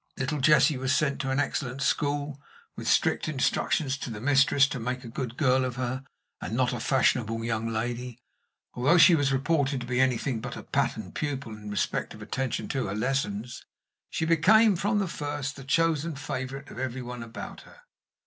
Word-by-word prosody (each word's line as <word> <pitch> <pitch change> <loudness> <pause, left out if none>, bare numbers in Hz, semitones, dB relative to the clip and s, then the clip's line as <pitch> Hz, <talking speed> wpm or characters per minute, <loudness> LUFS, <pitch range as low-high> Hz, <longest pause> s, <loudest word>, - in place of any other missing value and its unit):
Little 145 +3 -1
Jessie 150 0 +5
was 130 +1 +1
sent 145 -4 0
to 135 - -3
an 135 +1 +1
excellent 135 -1 -2
school, 145 +1 -1 0.3
with - - -6
strict - - +2
instructions 140 -1 0
to - - -5
the 110 -2 -6
mistress 135 +2 +4
to 135 - -4
make 125 +2 -3
a - - -8
good 120 0 -5
girl 130 -2 +3
of 125 -1 -3
her, 130 +1 -3 0.4
and 115 - -3
not 125 -1 +2
a 120 - -3
fashionable 115 -3 +1
young 115 -1 -1
lady. 120 +2 -3 0.6
Although 140 +8 +3
she 175 +1 +8
was 145 -4 +2
reported 140 0 +1
to - - -5
be 125 +1 +1
anything 125 -2 0
but - - -6
a - - -8
pattern - - -1
pupil 140 -5 -4
in 105 -1 -9
respect 105 -3 -2
of - - -13
attention 135 -2 -2
to 135 -6 -1
her 95 - -3
lessons, 120 -1 -2 0.5
she 160 - -1
became 195 +7 +5
from 205 +5 0
the 200 -2 +1
first 145 -3 -4
the 135 - -10
chosen 165 +2 +1
favorite 135 0 -5
of - - -8
every 130 0 -3
one 125 0 -7
about 115 0 -8
her. - - -17
135 Hz, 190 wpm, -27 LUFS, 125-145 Hz, 0.6 s, she